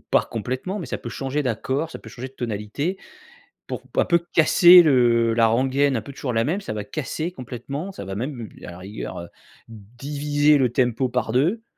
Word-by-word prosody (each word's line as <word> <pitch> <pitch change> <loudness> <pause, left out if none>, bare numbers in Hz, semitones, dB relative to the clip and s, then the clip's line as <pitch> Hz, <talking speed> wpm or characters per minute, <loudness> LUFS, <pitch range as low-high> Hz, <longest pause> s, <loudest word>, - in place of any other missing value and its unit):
pas - - +4
complètement, 130 - -4
mais 175 - -6
ça - - -3
peut 120 - -7
changer 135 +4 -2
d'accord, 135 +6 -2
ça - - -8
peut - - -13
changer 125 +3 -7
de - - -23
tonalité, 120 - -3 0.7
pour - - -5
p - - -5
un - - +4
peu 170 -1 +3
casser 175 +2 +8
le 120 -5 +3
la 115 0 +4
rengaine, 130 +4 +2
un 110 - -1
peu 140 - -10
toujours 130 -2 -4
la 115 0 +2
même, 175 - -1
ça 195 - -5
va 105 - -4
casser 155 - -4
complètement, 135 +5 -6
ça 145 - -8
va 95 - -5
même, 120 +1 -4 0.2
à - - -7
la 85 - -11
rigueur, 100 +4 -7
heu, 85 - -9 0.4
diviser 145 +7 0
le 125 -3 +2
tempo 125 0 +1
par 120 -2 -1
2 170 - +1
130 Hz, 210 wpm, -23 LUFS, 115-150 Hz, 0.7 s, casser